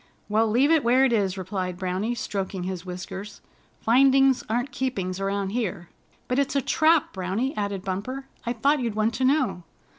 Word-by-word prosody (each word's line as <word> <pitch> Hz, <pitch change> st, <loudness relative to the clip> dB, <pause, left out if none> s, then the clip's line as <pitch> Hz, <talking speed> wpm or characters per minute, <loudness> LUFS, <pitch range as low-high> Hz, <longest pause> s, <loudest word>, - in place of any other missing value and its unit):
"Well, 220 Hz, +2 st, +3 dB
leave 260 Hz, +8 st, +3 dB
it 320 Hz, -3 st, +4 dB
where 250 Hz, +3 st, +4 dB
it 250 Hz, -, +2 dB
is," 195 Hz, -3 st, +1 dB
replied 185 Hz, -1 st, -3 dB
Browny, 190 Hz, +6 st, -2 dB
stroking 195 Hz, -4 st, -3 dB
his 185 Hz, -1 st, -5 dB
whiskers. 190 Hz, +3 st, -7 dB, 0.4 s
"Findings 270 Hz, +2 st, +4 dB
aren't 245 Hz, +4 st, -1 dB
keepings 195 Hz, -9 st, -2 dB
around 195 Hz, 0 st, -1 dB
here." 200 Hz, -7 st, -3 dB, 0.4 s
"But 250 Hz, +2 st, +1 dB
it's 280 Hz, 0 st, 0 dB
a 275 Hz, -, +3 dB
trap, 315 Hz, +2 st, +3 dB
Browny," 195 Hz, +9 st, -2 dB
added 200 Hz, -2 st, -3 dB
Bumper. 215 Hz, +9 st, -4 dB, 0.2 s
"I 235 Hz, -, -2 dB
thought 280 Hz, +6 st, +2 dB
you'd 230 Hz, -4 st, -2 dB
want 215 Hz, +2 st, +1 dB
to 260 Hz, +3 st, 0 dB
know." 255 Hz, -, +2 dB
220 Hz, 175 wpm, -25 LUFS, 190-260 Hz, 0.4 s, it